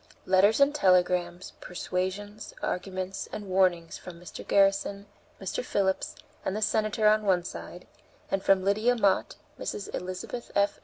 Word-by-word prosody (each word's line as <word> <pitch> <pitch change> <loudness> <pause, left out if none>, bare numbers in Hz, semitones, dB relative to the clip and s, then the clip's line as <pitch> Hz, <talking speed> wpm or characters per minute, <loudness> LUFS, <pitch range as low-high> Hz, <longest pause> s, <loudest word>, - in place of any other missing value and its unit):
Letters 195 +5 +4
and 280 +1 +5
telegrams, 180 -6 +2
persuasions, 190 +4 -4
arguments, 185 +1 -3
and 205 -1 -6
warnings 185 -3 +1
from 175 -2 -10
Mr. 175 - -9
Garrison, 200 0 +2 0.3
Mr. - - -3
Phillips, 190 - 0 0.3
and 190 - -2
the 215 - -2
Senator 215 0 +2
on 215 0 +5
the 210 - -7
one 180 -2 +3
side, 180 +1 -8 0.5
and 195 - +1
from 190 -1 +3
Lydia 215 +5 +2
Mott, 200 -5 +2 0.2
Mrs. 200 - -5
Elizabeth 185 +6 -5
F. 200 0 +2
195 Hz, 145 wpm, -28 LUFS, 185-210 Hz, 0.5 s, and